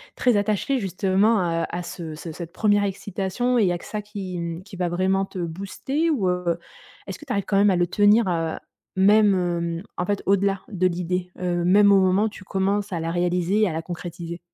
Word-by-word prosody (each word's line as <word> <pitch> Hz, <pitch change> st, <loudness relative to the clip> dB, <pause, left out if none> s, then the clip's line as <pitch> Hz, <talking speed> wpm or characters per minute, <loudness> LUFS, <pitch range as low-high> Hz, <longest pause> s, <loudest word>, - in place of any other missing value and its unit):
très 245 Hz, -4 st, +2 dB
attachée 215 Hz, +6 st, 0 dB
justement, 190 Hz, -2 st, +1 dB
heu, -, -, 0 dB
à 175 Hz, +1 st, -4 dB
ce 165 Hz, -3 st, -7 dB
ce 165 Hz, +1 st, -7 dB
cette 170 Hz, +1 st, -8 dB
1re 205 Hz, +2 st, +2 dB
excitation 200 Hz, +5 st, -1 dB
et -, -, +4 dB
il 190 Hz, -, +3 dB
y -, -, +2 dB
a 175 Hz, -, -1 dB
que -, -, -13 dB
ça 210 Hz, -, -4 dB
qui, 195 Hz, -4 st, -6 dB
mmh, 170 Hz, +1 st, -5 dB
qui 200 Hz, 0 st, -12 dB
va 180 Hz, -1 st, -1 dB
vraiment 190 Hz, +2 st, +1 dB
te 195 Hz, -, -11 dB
booster 200 Hz, -, -2 dB
ou, 220 Hz, -12 st, +1 dB
heu, 180 Hz, -2 st, 0 dB, 0.5 s
est-ce -, -, -7 dB
que 300 Hz, -, -12 dB
tu 265 Hz, -, -7 dB
arrives 200 Hz, -4 st, 0 dB
quand 195 Hz, -, +1 dB
même 205 Hz, +1 st, +5 dB
à 190 Hz, -, +3 dB
le 175 Hz, 0 st, +2 dB
tenir, 205 Hz, +3 st, +4 dB
heu, 165 Hz, -2 st, -1 dB, 0.4 s
même, 205 Hz, +1 st, +5 dB
hem, 170 Hz, -1 st, -2 dB
en 180 Hz, -, -1 dB
fait, 205 Hz, 0 st, -2 dB
au-delà 195 Hz, 0 st, +2 dB
de 185 Hz, -3 st, +1 dB
l'idée, 180 Hz, +1 st, -2 dB
heu, 175 Hz, -1 st, -1 dB
même 200 Hz, +3 st, +5 dB
au 195 Hz, -, +6 dB
moment 190 Hz, +2 st, +3 dB
où 220 Hz, -, +1 dB
tu 205 Hz, -2 st, -12 dB
commences 200 Hz, +2 st, -1 dB
à 170 Hz, -, -2 dB
la 165 Hz, +1 st, -2 dB
réaliser 180 Hz, +3 st, +1 dB
et 210 Hz, -, +3 dB
à 160 Hz, -, -4 dB
la 160 Hz, -, -2 dB
concrétiser? 170 Hz, 0 st, -7 dB
190 Hz, 230 wpm, -23 LUFS, 175-205 Hz, 0.5 s, au